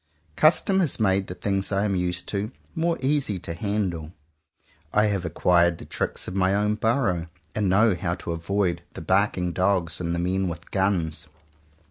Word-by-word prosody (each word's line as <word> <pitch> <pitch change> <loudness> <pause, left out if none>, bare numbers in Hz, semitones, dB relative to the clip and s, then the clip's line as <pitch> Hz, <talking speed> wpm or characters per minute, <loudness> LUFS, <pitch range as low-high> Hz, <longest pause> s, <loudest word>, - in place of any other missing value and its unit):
Custom 175 - +4
has 170 -9 +1
made 95 -2 +2
the 90 - -6
things 95 +2 -1
I 100 0 +1
am 100 -2 0
used 90 -1 -1
to, 105 +3 -2 0.2
more 165 0 0
easy 135 -7 +1
to 85 - -5
handle. 90 -4 -2 0.8
I 105 +1 +4
have 100 -4 0
acquired 85 0 +3
the - - -10
tricks - - -3
of - - -5
my 95 0 +2
own 105 +1 +2
burrow, 105 -6 0 0.3
and 105 -3 0
know 105 +3 +4
how 90 -1 -2
to 85 - -6
avoid 85 +1 -1
the - - -7
barking 90 0 +1
dogs 90 -1 +1
and 85 0 -1
the - - -2
men 95 +2 0
with 85 0 -8
guns. 85 -5 0
95 Hz, 175 wpm, -25 LUFS, 85-105 Hz, 0.8 s, Custom